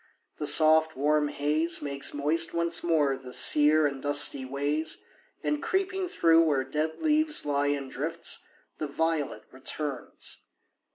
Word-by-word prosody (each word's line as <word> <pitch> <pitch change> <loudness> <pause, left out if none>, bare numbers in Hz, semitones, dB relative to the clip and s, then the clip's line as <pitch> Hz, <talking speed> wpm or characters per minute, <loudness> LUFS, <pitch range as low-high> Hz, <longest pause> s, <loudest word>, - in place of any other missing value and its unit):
The 150 - 0
soft, 160 0 +5
warm 150 +2 +1
haze 150 +4 0
Makes 140 -1 -1
moist 160 +4 0
once 170 0 0
more 155 -5 +1
the 130 -1 -11
sere 150 +3 +4
and 140 -2 -3
dusty 145 -1 +1
ways, 145 +4 -2 0.5
And, 300 -1 -1
creeping 380 -1 -2
through 165 - +3
where 145 -5 +1
dead 155 +4 -4
leaves 310 0 +3
lie 145 0 0
in 140 -1 -2
drifts, 160 +6 -3 0.4
The 155 - -3
violet 150 -6 -2
returns. 135 0 -5
150 Hz, 135 wpm, -27 LUFS, 140-165 Hz, 0.5 s, soft